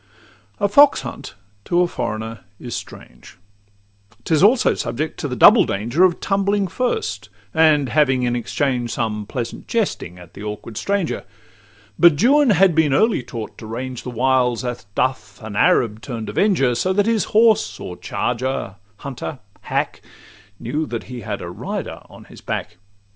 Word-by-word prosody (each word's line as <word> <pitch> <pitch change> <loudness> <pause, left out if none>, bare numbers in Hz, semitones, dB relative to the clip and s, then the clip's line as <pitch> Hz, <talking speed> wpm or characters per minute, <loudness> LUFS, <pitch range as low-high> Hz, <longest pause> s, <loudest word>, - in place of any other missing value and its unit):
A 205 - +2
fox 285 +8 +6
hunt 125 -5 -8 0.3
to 175 0 +2
a 180 - +3
foreigner 110 -6 -4 0.2
is 120 -2 -7
strange; - - -11 0.9
'Tis 155 +3 +1
also 225 +6 +5
subject 140 +7 -4
to - - -2
the 125 - -4
double - - +7
danger 120 - 0
Of 180 -2 +3
tumbling 200 0 +1
first, 175 - -2 0.2
and 155 -3 +4
having 135 -2 +2
in 120 0 0
exchange 120 0 -1
Some 105 -3 -3
pleasant 120 -1 -5
jesting 190 - -2
at 90 -2 -14
the - - -11
awkward 105 +1 -7
stranger: 195 - -1 0.8
But 170 -4 +6
Juan 280 - +5
had 190 -3 +5
been 150 -4 +3
early 220 - +3
taught 115 -2 -8
to 110 - -9
range 125 +2 -5
The - - -7
wilds, 125 0 +1
as 120 -2 -5
doth 130 +1 -2
an 110 -2 -7
Arab 110 0 +2
turn'd 110 0 -6
avenger, 175 - +2
So 185 +11 0
that 205 +1 +2
his 225 -2 +1
horse, 220 0 +3
or 90 - -7
charger, 125 -1 -3 0.2
hunter, 140 +3 -6 0.2
hack, - - -2 0.6
Knew 150 +7 -3
that 115 -1 -4
he 125 -2 -8
had 105 -1 -5
a 85 - -6
rider - - -5
on - - -14
his - - -15
back. - - -5
130 Hz, 160 wpm, -20 LUFS, 115-180 Hz, 0.9 s, double